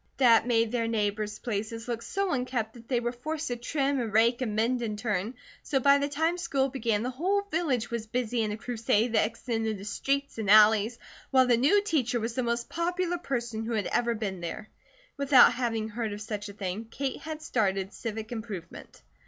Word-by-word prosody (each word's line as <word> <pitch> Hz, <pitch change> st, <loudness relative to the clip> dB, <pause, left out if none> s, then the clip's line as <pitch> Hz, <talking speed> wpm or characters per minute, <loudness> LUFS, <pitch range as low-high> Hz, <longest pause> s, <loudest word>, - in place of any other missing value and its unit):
That 235 Hz, -3 st, +5 dB
made 230 Hz, -2 st, +2 dB
their 235 Hz, -2 st, 0 dB
neighbours' 210 Hz, -1 st, -1 dB
places 225 Hz, 0 st, -4 dB
look 235 Hz, -1 st, -3 dB
so 390 Hz, +8 st, -2 dB
unkempt 250 Hz, -5 st, -2 dB
that 230 Hz, -1 st, -14 dB
they 250 Hz, -3 st, +1 dB
were 240 Hz, 0 st, -2 dB
forced 305 Hz, +5 st, -4 dB
to 245 Hz, -, -1 dB
trim, 275 Hz, +3 st, -1 dB
and 230 Hz, -3 st, -2 dB
rake, 230 Hz, +4 st, +3 dB
and 220 Hz, -5 st, -2 dB
mend 240 Hz, +3 st, +1 dB
in 215 Hz, -3 st, -3 dB
turn, 210 Hz, +1 st, -2 dB, 0.3 s
so 270 Hz, -, 0 dB
by 280 Hz, +2 st, +5 dB
the 285 Hz, +1 st, -1 dB
time 320 Hz, +4 st, 0 dB
the -, -, -6 dB
school 275 Hz, -4 st, 0 dB
began, 230 Hz, -5 st, -1 dB
the 250 Hz, -, -2 dB
whole 380 Hz, +10 st, 0 dB
village 275 Hz, -9 st, 0 dB
was 230 Hz, -2 st, -3 dB
busy 240 Hz, 0 st, -1 dB
in 215 Hz, -1 st, -1 dB
a 210 Hz, -, -4 dB
crusade 230 Hz, -1 st, 0 dB
that 215 Hz, -, +4 dB
extended 225 Hz, -1 st, -3 dB
to 195 Hz, -, -9 dB
streets 275 Hz, +5 st, -2 dB
and 210 Hz, -3 st, -2 dB
alleys, 215 Hz, +2 st, +6 dB, 0.3 s
while 260 Hz, -1 st, +5 dB
the 245 Hz, -1 st, +4 dB
new 300 Hz, -, +4 dB
teacher 255 Hz, -, 0 dB
was 230 Hz, +1 st, -3 dB
the 255 Hz, -, -1 dB
most 235 Hz, 0 st, -1 dB
popular 350 Hz, +1 st, -1 dB
person 235 Hz, -7 st, -3 dB
who 230 Hz, +1 st, -3 dB
had 215 Hz, -3 st, 0 dB
ever 235 Hz, -1 st, +1 dB
been 195 Hz, -5 st, -4 dB
there. 175 Hz, +5 st, -6 dB, 0.5 s
Without 275 Hz, -3 st, +6 dB
having 225 Hz, -3 st, -2 dB
heard 220 Hz, -1 st, -3 dB
of 205 Hz, -, -7 dB
such 210 Hz, -1 st, -5 dB
a -, -, -9 dB
thing, 200 Hz, +2 st, -4 dB
Kate 265 Hz, +4 st, -4 dB
had 310 Hz, 0 st, -6 dB
started 195 Hz, -6 st, 0 dB
Civic 220 Hz, 0 st, -5 dB
Improvement. 210 Hz, -7 st, -8 dB
235 Hz, 210 wpm, -28 LUFS, 220-265 Hz, 0.5 s, alleys